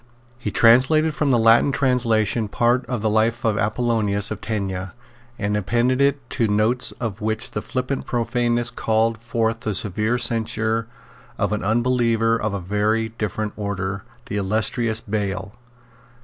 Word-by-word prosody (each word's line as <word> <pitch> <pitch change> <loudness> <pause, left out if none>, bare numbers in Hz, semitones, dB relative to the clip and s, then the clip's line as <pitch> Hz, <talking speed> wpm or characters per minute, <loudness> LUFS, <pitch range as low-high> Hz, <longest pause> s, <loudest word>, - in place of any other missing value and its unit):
He 115 - -3
translated 130 +9 +4
from 150 -1 0
the 125 - +4
Latin 115 +4 +5
translation 120 -5 +1
part 120 +4 +1
of 120 -5 -3
the 110 - +2
Life 110 +2 +1
of 110 -2 +2
Apollonius 110 -2 0
of 105 - -5
Tyana, 95 -4 -3 0.4
and 105 +1 -1
appended 125 +7 +2 0.2
to 120 - -1
it - - -1
notes 110 +4 +2
of 110 -2 -5
which 110 +1 -1
the 105 - -3
flippant 130 +3 -3
profaneness 120 0 0
called 115 -1 0
forth 115 0 -1
the 110 -3 -2
severe 105 +5 0
censure 115 -1 0 0.5
of - - 0
an 105 - -2
unbeliever 115 0 +2
of 110 -2 -2
a - - -2
very 105 +4 0
different 110 -1 -4
order, 100 -1 -3 0.2
the 110 -6 -4
illustrious 110 +3 0
Bayle. 100 -1 -3
110 Hz, 150 wpm, -22 LUFS, 105-120 Hz, 0.5 s, Latin